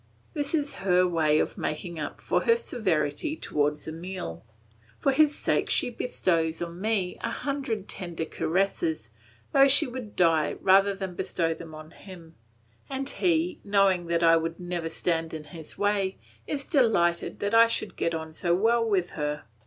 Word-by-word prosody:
This 290 Hz, -1 st, 0 dB
is 290 Hz, -2 st, -1 dB
her 180 Hz, -1 st, +3 dB
way 155 Hz, -3 st, +2 dB
of -, -, -1 dB
making 165 Hz, +2 st, -4 dB
up 145 Hz, -, -5 dB
for -, -, +1 dB
her 460 Hz, -, +5 dB
severity 215 Hz, -, -1 dB
towards 150 Hz, -, -1 dB
Emile. 165 Hz, -, -6 dB, 0.5 s
For 275 Hz, -, +2 dB
his 295 Hz, +1 st, +4 dB
sake -, -, 0 dB
she -, -, +2 dB
bestows 165 Hz, -9 st, -1 dB
on 175 Hz, +1 st, -6 dB
me 205 Hz, -4 st, -1 dB
a 230 Hz, -, -2 dB
hundred 260 Hz, -6 st, -3 dB
tender 175 Hz, -4 st, -3 dB
caresses, 160 Hz, -, -1 dB, 0.4 s
though 275 Hz, 0 st, +6 dB
she 285 Hz, +3 st, +6 dB
would 245 Hz, -4 st, -7 dB
die 165 Hz, -3 st, +3 dB
rather 195 Hz, +1 st, +4 dB
than 190 Hz, -2 st, -5 dB
bestow 165 Hz, -1 st, -1 dB
them 160 Hz, -1 st, -10 dB
on 155 Hz, +1 st, -11 dB
him; 175 Hz, -4 st, -13 dB, 0.6 s
and 270 Hz, 0 st, -3 dB
he, 340 Hz, +2 st, 0 dB
knowing 195 Hz, -3 st, +2 dB
that 170 Hz, 0 st, +1 dB
I 165 Hz, 0 st, +6 dB
would 165 Hz, 0 st, -3 dB
never 175 Hz, -2 st, -3 dB
stand 165 Hz, -1 st, -2 dB
in 155 Hz, -, -6 dB
his 155 Hz, +1 st, -10 dB
way, 200 Hz, -2 st, 0 dB, 0.3 s
is 280 Hz, -2 st, -3 dB
delighted 205 Hz, -, +2 dB
that 205 Hz, +2 st, -2 dB
I 230 Hz, 0 st, +7 dB
should 230 Hz, -2 st, -2 dB
get 170 Hz, -, -1 dB
on 160 Hz, 0 st, -6 dB
so 170 Hz, +1 st, +1 dB
well 230 Hz, +5 st, +3 dB
with 195 Hz, -6 st, 0 dB
her. 150 Hz, 0 st, -3 dB
180 Hz, 170 wpm, -27 LUFS, 165-230 Hz, 0.6 s, I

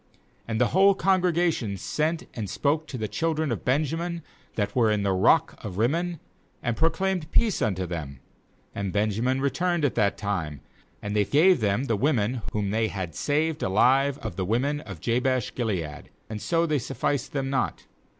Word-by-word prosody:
13And 110 Hz, -, -1 dB
the 125 Hz, +1 st, +3 dB
whole 195 Hz, +2 st, +5 dB
congregation 175 Hz, -, +1 dB
sent 155 Hz, -, -2 dB
and 105 Hz, -4 st, -4 dB
spoke 150 Hz, -, 0 dB
to 130 Hz, -, -6 dB
the 110 Hz, -2 st, -2 dB
children 160 Hz, +1 st, -1 dB
of 105 Hz, -7 st, -3 dB
Ben 140 Hz, +5 st, +2 dB
jamin 170 Hz, +2 st, -3 dB, 0.3 s
that 100 Hz, -1 st, -1 dB
were 115 Hz, -3 st, +4 dB
in 105 Hz, -1 st, +1 dB
the 100 Hz, -, +1 dB
rock 95 Hz, 0 st, +3 dB
of 95 Hz, -3 st, -6 dB
Rim 115 Hz, +5 st, +3 dB
mon, 170 Hz, 0 st, -2 dB, 0.4 s
and 120 Hz, -2 st, 0 dB
proclaimed 165 Hz, +1 st, 0 dB
peace 225 Hz, -5 st, +2 dB
unto 95 Hz, -4 st, 0 dB
them. 75 Hz, -6 st, -6 dB, 0.6 s
34And 100 Hz, -2 st, -2 dB
Benjamin 110 Hz, +6 st, +1 dB
returned 165 Hz, +4 st, +1 dB
at 140 Hz, -, +1 dB
that 105 Hz, -3 st, +1 dB
time; 85 Hz, -9 st, -3 dB, 0.4 s
and 105 Hz, 0 st, -3 dB
they 105 Hz, -, +4 dB
gave 165 Hz, -, +4 dB
them 105 Hz, +3 st, +1 dB
the 115 Hz, -5 st, 0 dB
women 120 Hz, -1 st, +1 dB
whom 100 Hz, -2 st, -1 dB
they 110 Hz, +1 st, +1 dB
had 95 Hz, -6 st, -5 dB
saved 155 Hz, -, 0 dB
alive 135 Hz, +8 st, +3 dB
of 85 Hz, -, -5 dB
the 95 Hz, -, 0 dB
women 130 Hz, +8 st, 0 dB
of 100 Hz, -, -9 dB
Jabesh 125 Hz, +1 st, 0 dB
gilead; 90 Hz, -, -3 dB, 0.2 s
and 105 Hz, -, -4 dB
yet -, -, -13 dB
so 170 Hz, 0 st, +1 dB
they 155 Hz, -3 st, +1 dB
sufficed 130 Hz, +2 st, -2 dB
them 135 Hz, -1 st, -2 dB
not. 135 Hz, -3 st, -1 dB
125 Hz, 185 wpm, -26 LUFS, 105-155 Hz, 0.6 s, whole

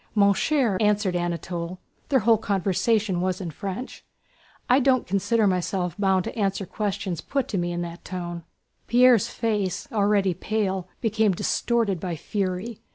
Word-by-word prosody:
"Mon 200 Hz, -1 st, +5 dB
cher," 245 Hz, -6 st, +1 dB
answered 210 Hz, -3 st, +2 dB
Anatole 175 Hz, 0 st, -3 dB, 0.3 s
(their 265 Hz, -3 st, +3 dB
whole 225 Hz, 0 st, +4 dB
conversation 195 Hz, 0 st, +1 dB
was 185 Hz, 0 st, -1 dB
in 175 Hz, -4 st, -5 dB
French), 200 Hz, -, -6 dB, 0.6 s
"I 250 Hz, +2 st, +5 dB
don't 260 Hz, -2 st, +3 dB
consider 210 Hz, +4 st, +1 dB
myself 180 Hz, -2 st, 0 dB
bound 190 Hz, -2 st, +2 dB
to -, -, -6 dB
answer 195 Hz, -2 st, -1 dB
questions 195 Hz, -3 st, -3 dB
put 275 Hz, -3 st, -2 dB
to 195 Hz, -, -1 dB
me 175 Hz, 0 st, -1 dB
in 175 Hz, 0 st, -2 dB
that 170 Hz, 0 st, -8 dB
tone." 175 Hz, -2 st, -5 dB, 0.5 s
Pierre's 245 Hz, -3 st, +5 dB
face, 205 Hz, -4 st, -2 dB
already 200 Hz, -3 st, +2 dB
pale, 190 Hz, -1 st, -2 dB
became 220 Hz, -3 st, +2 dB
distorted 220 Hz, +1 st, 0 dB
by 175 Hz, -1 st, -3 dB
fury. 195 Hz, +5 st, -3 dB
195 Hz, 150 wpm, -25 LUFS, 180-220 Hz, 0.6 s, Mon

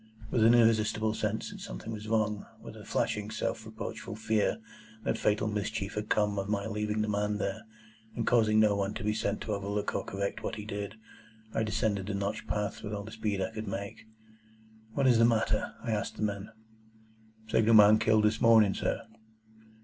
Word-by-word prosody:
With 115 Hz, -, +3 dB
an 115 Hz, +2 st, +7 dB
irresistible 110 Hz, -1 st, +3 dB
sense 110 Hz, 0 st, -2 dB
that -, -, -9 dB
something -, -, -7 dB
was 105 Hz, 0 st, -7 dB
wrong,—with 105 Hz, -2 st, -2 dB
a -, -, -10 dB
flashing 105 Hz, 0 st, -1 dB
self 110 Hz, 0 st, -3 dB
reproachful 110 Hz, 0 st, -6 dB
fear 110 Hz, -, +1 dB, 0.5 s
that -, -, 0 dB
fatal 105 Hz, +1 st, +1 dB
mischief 105 Hz, -1 st, -2 dB
had 105 Hz, 0 st, -4 dB
come 105 Hz, -1 st, +1 dB
of 100 Hz, +1 st, -4 dB
my 100 Hz, -1 st, 0 dB
leaving 105 Hz, 0 st, -1 dB
the -, -, -2 dB
man 105 Hz, 0 st, 0 dB
there, 105 Hz, +2 st, -3 dB, 0.5 s
and 115 Hz, -, -1 dB
causing 110 Hz, -3 st, +4 dB
no 105 Hz, -2 st, +4 dB
one 100 Hz, 0 st, -1 dB
to -, -, -5 dB
be 105 Hz, +1 st, +1 dB
sent 105 Hz, -1 st, -2 dB
to 110 Hz, -, -2 dB
overlook 100 Hz, +1 st, -2 dB
or -, -, -1 dB
correct 100 Hz, 0 st, -3 dB
what -, -, -3 dB
he 105 Hz, -1 st, -7 dB
did,—I 110 Hz, +1 st, -7 dB
descended 105 Hz, -2 st, 0 dB
the 100 Hz, -, -2 dB
notched 100 Hz, 0 st, -3 dB
path 105 Hz, -1 st, -2 dB
with 105 Hz, 0 st, -4 dB
all 100 Hz, -, -5 dB
the 110 Hz, -, -9 dB
speed 105 Hz, -3 st, -2 dB
I 110 Hz, -, -3 dB
could 110 Hz, -1 st, -6 dB
make. 100 Hz, +3 st, -6 dB, 0.9 s
"What 140 Hz, -, +2 dB
is 120 Hz, -3 st, +5 dB
the -, -, +6 dB
matter?" 110 Hz, -2 st, +1 dB
I 115 Hz, -, -2 dB
asked 105 Hz, -2 st, -2 dB
the -, -, -4 dB
men. 100 Hz, -1 st, -2 dB, 1.0 s
"Signal 115 Hz, +1 st, +4 dB
man 105 Hz, 0 st, +8 dB
killed 110 Hz, -1 st, +3 dB
this 105 Hz, +1 st, +2 dB
morning, 110 Hz, -4 st, +6 dB
sir." -, -, -2 dB
105 Hz, 190 wpm, -30 LUFS, 105-110 Hz, 1.0 s, man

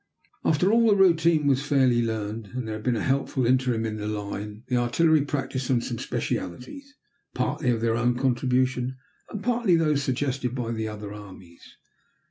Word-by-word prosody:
After 170 Hz, +6 st, +2 dB
all 230 Hz, 0 st, +4 dB
the 210 Hz, -, +5 dB
routine 170 Hz, -5 st, +4 dB
was 135 Hz, -1 st, +2 dB
fairly 130 Hz, -5 st, +3 dB
learned, 110 Hz, -1 st, -3 dB
and 125 Hz, -3 st, -3 dB
there 110 Hz, -, -3 dB
had 110 Hz, 0 st, -6 dB
been 125 Hz, 0 st, +1 dB
a 110 Hz, -, -2 dB
helpful 135 Hz, -1 st, 0 dB
interim 125 Hz, -2 st, +1 dB
in 110 Hz, -1 st, -3 dB
the 105 Hz, 0 st, -4 dB
line, 105 Hz, +1 st, -5 dB
the 125 Hz, -, -1 dB
artillery 155 Hz, +6 st, +3 dB
practised 135 Hz, -3 st, -3 dB
on 125 Hz, -2 st, +3 dB
some 120 Hz, -1 st, -5 dB
specialties, 275 Hz, -, -5 dB, 0.4 s
partly 130 Hz, -, -1 dB
of 115 Hz, -2 st, +1 dB
their 115 Hz, -1 st, +1 dB
own 120 Hz, +1 st, +1 dB
contribution, 130 Hz, 0 st, 0 dB, 0.3 s
and 205 Hz, -2 st, -6 dB
partly 235 Hz, -6 st, +2 dB
those 150 Hz, -3 st, +2 dB
suggested 130 Hz, -1 st, -2 dB
by 120 Hz, -3 st, -3 dB
the 110 Hz, -1 st, -3 dB
other 105 Hz, -1 st, -7 dB
armies. 95 Hz, -4 st, -13 dB
125 Hz, 175 wpm, -25 LUFS, 115-145 Hz, 0.4 s, the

